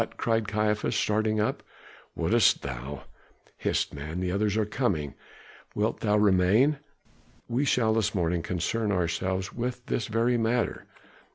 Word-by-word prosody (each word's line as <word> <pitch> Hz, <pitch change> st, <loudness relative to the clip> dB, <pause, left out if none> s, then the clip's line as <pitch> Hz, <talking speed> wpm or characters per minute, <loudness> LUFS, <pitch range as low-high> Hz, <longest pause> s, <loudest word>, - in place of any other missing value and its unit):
cried 115 Hz, -2 st, 0 dB
Caiaphas, 105 Hz, 0 st, 0 dB
starting 110 Hz, 0 st, +1 dB
up. 105 Hz, -, 0 dB, 0.5 s
"Wouldst -, -, +3 dB
thou 65 Hz, +1 st, -6 dB, 0.3 s
?" -, -, -33 dB
"Hist, -, -, 0 dB
man, 75 Hz, +4 st, -5 dB
the 90 Hz, -1 st, -1 dB
others 105 Hz, +2 st, 0 dB
are 110 Hz, -, +2 dB
coming! 95 Hz, -, -1 dB, 0.6 s
wilt 105 Hz, +2 st, 0 dB
thou 105 Hz, -1 st, +2 dB
remain? 105 Hz, +8 st, +4 dB, 0.7 s
We 125 Hz, +5 st, 0 dB
shall 115 Hz, -5 st, +2 dB
this 110 Hz, -1 st, 0 dB
morning 85 Hz, -1 st, 0 dB
concern 105 Hz, +6 st, -1 dB
ourselves 95 Hz, +1 st, -1 dB
with 125 Hz, +1 st, -4 dB
this 115 Hz, -, -2 dB
very 115 Hz, +2 st, +1 dB
matter." 115 Hz, +1 st, 0 dB
105 Hz, 140 wpm, -27 LUFS, 90-115 Hz, 0.7 s, remain